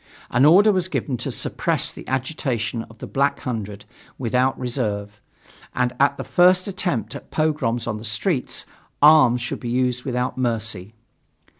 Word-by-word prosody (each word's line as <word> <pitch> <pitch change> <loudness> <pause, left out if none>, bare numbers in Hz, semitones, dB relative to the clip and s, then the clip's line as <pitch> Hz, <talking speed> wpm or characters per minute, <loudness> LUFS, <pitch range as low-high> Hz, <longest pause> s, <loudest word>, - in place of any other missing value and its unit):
An 125 +3 +4
order 195 +8 +7
was 185 -3 0
given 140 -7 -2
to - - -4
suppress - - -1
the - - -11
agitation 130 -4 -2
of 115 - -16
the - - -7
Black 140 +1 0
Hundred 105 -5 -5 0.3
without 125 +1 +1
reserve, 105 -5 -3 0.5
and 125 0 +1
at 140 0 +3
the - - -4
first 180 +1 +4
attempts 145 - -2
at - - -10
pogroms 145 -7 0
on 110 -2 -3
the 105 - -9
streets, 125 - -1 0.4
arms 145 -6 +6
should 120 - -4
be 120 - -5
used 125 0 0
without 125 -1 -2
mercy. 110 -4 -2
125 Hz, 155 wpm, -22 LUFS, 115-145 Hz, 0.5 s, order